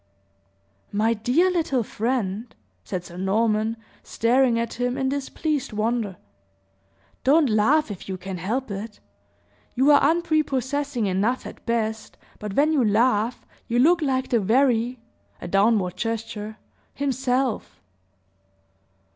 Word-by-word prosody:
"My 220 Hz, +3 st, +2 dB
dear 255 Hz, -, +2 dB
little 320 Hz, -8 st, 0 dB
friend," 225 Hz, -1 st, -2 dB, 0.3 s
said 180 Hz, -2 st, -5 dB
Sir 175 Hz, -, -11 dB
Norman, 215 Hz, +3 st, +1 dB, 0.2 s
staring 240 Hz, +1 st, +2 dB
at 230 Hz, 0 st, -3 dB
him 245 Hz, +1 st, 0 dB
in 265 Hz, -1 st, 0 dB
displeased 280 Hz, -1 st, -2 dB
wonder, 215 Hz, -3 st, -1 dB, 1.1 s
"don't 295 Hz, +2 st, +4 dB
laugh, 225 Hz, +6 st, +3 dB
if 195 Hz, -1 st, -8 dB
you 190 Hz, -, -3 dB
can 185 Hz, 0 st, -6 dB
help 225 Hz, +7 st, -2 dB
it. 205 Hz, +2 st, -6 dB, 0.8 s
You 265 Hz, +4 st, +4 dB
are 285 Hz, -, +6 dB
unprepossessing 290 Hz, -6 st, 0 dB
enough 205 Hz, +7 st, 0 dB
at -, -, -10 dB
best, 220 Hz, -1 st, -2 dB, 0.2 s
but 210 Hz, -2 st, -5 dB
when 300 Hz, +3 st, +3 dB
you 280 Hz, -5 st, +3 dB
laugh, 225 Hz, +1 st, +1 dB, 0.2 s
you 235 Hz, -, 0 dB
look 330 Hz, +7 st, +4 dB
like 260 Hz, -3 st, 0 dB
the 235 Hz, -, +3 dB
very 240 Hz, +3 st, +2 dB, 0.4 s
(a -, -, -7 dB
downward 195 Hz, -1 st, +2 dB
gesture) 220 Hz, -1 st, -4 dB, 0.4 s
himself!" 265 Hz, -3 st, -1 dB
235 Hz, 120 wpm, -24 LUFS, 210-270 Hz, 1.1 s, are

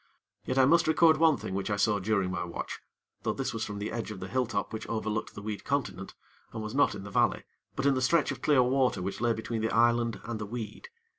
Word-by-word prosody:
Yet 130 Hz, -, -2 dB
I 130 Hz, -, +6 dB
must 165 Hz, +4 st, +4 dB
record 160 Hz, 0 st, +5 dB
one 160 Hz, -3 st, +4 dB
thing -, -, -6 dB
which 95 Hz, +2 st, -2 dB
I 105 Hz, -, +1 dB
saw 100 Hz, +1 st, +2 dB
during 95 Hz, -2 st, 0 dB
my 90 Hz, -, -2 dB
watch; 85 Hz, -, -5 dB, 0.4 s
though -, -, -1 dB
this -, -, -3 dB
was -, -, -2 dB
from 105 Hz, -, -5 dB
the 105 Hz, +1 st, -4 dB
edge 115 Hz, -1 st, -4 dB
of 105 Hz, -3 st, -7 dB
the 95 Hz, -, -6 dB
hilltop 115 Hz, -2 st, -1 dB
which 110 Hz, 0 st, -5 dB
overlooked 110 Hz, -1 st, -3 dB
the 105 Hz, -, -8 dB
weed 105 Hz, -1 st, -4 dB
continent, 130 Hz, -9 st, -3 dB, 0.4 s
and 110 Hz, -1 st, -5 dB
was 110 Hz, +1 st, -5 dB
not 145 Hz, -5 st, +3 dB
in 100 Hz, -, -7 dB
the 100 Hz, -, -8 dB
valley, -, -, +2 dB, 0.3 s
but 135 Hz, -, -2 dB
in 140 Hz, -, +5 dB
the 130 Hz, -, 0 dB
stretch 150 Hz, +5 st, +3 dB
of -, -, -6 dB
clear 140 Hz, -4 st, +4 dB
water 130 Hz, 0 st, +2 dB
which 95 Hz, +4 st, -4 dB
lay 120 Hz, -1 st, +3 dB
between 110 Hz, 0 st, -3 dB
the 110 Hz, -, 0 dB
island 115 Hz, 0 st, +2 dB
and 115 Hz, -1 st, -4 dB
the 105 Hz, -, -4 dB
weed. 110 Hz, -1 st, -6 dB
115 Hz, 250 wpm, -29 LUFS, 105-130 Hz, 0.4 s, I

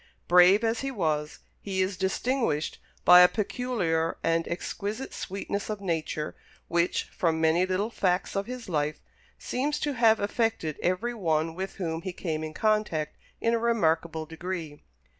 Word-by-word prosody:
Brave 180 Hz, +4 st, +6 dB
as 225 Hz, 0 st, +1 dB
he 275 Hz, -, -2 dB
was, 155 Hz, -, -1 dB, 0.2 s
he 195 Hz, -2 st, -3 dB
is 185 Hz, +1 st, +1 dB
distinguished 190 Hz, -, -1 dB, 0.3 s
by 180 Hz, 0 st, +10 dB
a 180 Hz, -, +9 dB
peculiar 195 Hz, -7 st, -1 dB
and 165 Hz, 0 st, +1 dB
exquisite 205 Hz, +7 st, -4 dB
sweetness 200 Hz, +2 st, -4 dB
of 210 Hz, -1 st, -3 dB
nature, 160 Hz, -4 st, -3 dB, 0.3 s
which, 170 Hz, +1 st, +1 dB
from 165 Hz, -2 st, +1 dB
many 165 Hz, +3 st, +3 dB
little 195 Hz, +5 st, -1 dB
facts 185 Hz, -3 st, 0 dB
of 195 Hz, +2 st, -1 dB
his 250 Hz, -1 st, -7 dB
life, 150 Hz, -3 st, -1 dB, 0.4 s
seems 290 Hz, +4 st, -2 dB
to 290 Hz, -, 0 dB
have 225 Hz, -3 st, +4 dB
affected 205 Hz, -7 st, -1 dB
every 185 Hz, +7 st, 0 dB
one 165 Hz, -6 st, 0 dB
with 190 Hz, +3 st, -5 dB
whom 165 Hz, -3 st, -3 dB
he 185 Hz, +1 st, -5 dB
came 160 Hz, -3 st, -3 dB
in 155 Hz, 0 st, -6 dB
contact 210 Hz, -8 st, 0 dB, 0.3 s
in 230 Hz, -, +2 dB
a 230 Hz, -, +2 dB
remarkable 165 Hz, -8 st, +1 dB
degree. 165 Hz, -2 st, -6 dB
185 Hz, 155 wpm, -27 LUFS, 160-220 Hz, 0.4 s, by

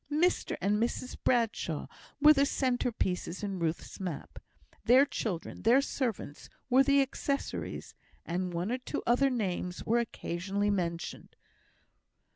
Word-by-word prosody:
Mr 340 Hz, +5 st, +1 dB
and 205 Hz, +3 st, +2 dB
Mrs 240 Hz, +2 st, -2 dB
Bradshaw 225 Hz, -, +1 dB, 0.3 s
were 300 Hz, +1 st, +8 dB
the 280 Hz, -1 st, +3 dB
centre 250 Hz, -3 st, 0 dB
pieces 180 Hz, -3 st, -2 dB
in 195 Hz, -2 st, -3 dB
Ruth's 165 Hz, -1 st, -3 dB
map; 180 Hz, -6 st, -5 dB, 0.4 s
their 250 Hz, +5 st, +6 dB
children, 195 Hz, -, -4 dB
their 240 Hz, +4 st, +5 dB
servants, 235 Hz, -, -3 dB, 0.2 s
were 260 Hz, +2 st, +7 dB
the 280 Hz, 0 st, +5 dB
accessories; 275 Hz, +1 st, -3 dB, 0.3 s
and 180 Hz, +2 st, -2 dB
one 175 Hz, +5 st, -2 dB
or 255 Hz, -, -1 dB
two 250 Hz, -, -4 dB
other 250 Hz, +3 st, +4 dB
names 185 Hz, -7 st, -2 dB
were 235 Hz, +2 st, +3 dB
occasionally 200 Hz, -2 st, -2 dB
mentioned. 170 Hz, -4 st, -3 dB
220 Hz, 130 wpm, -31 LUFS, 180-260 Hz, 0.4 s, were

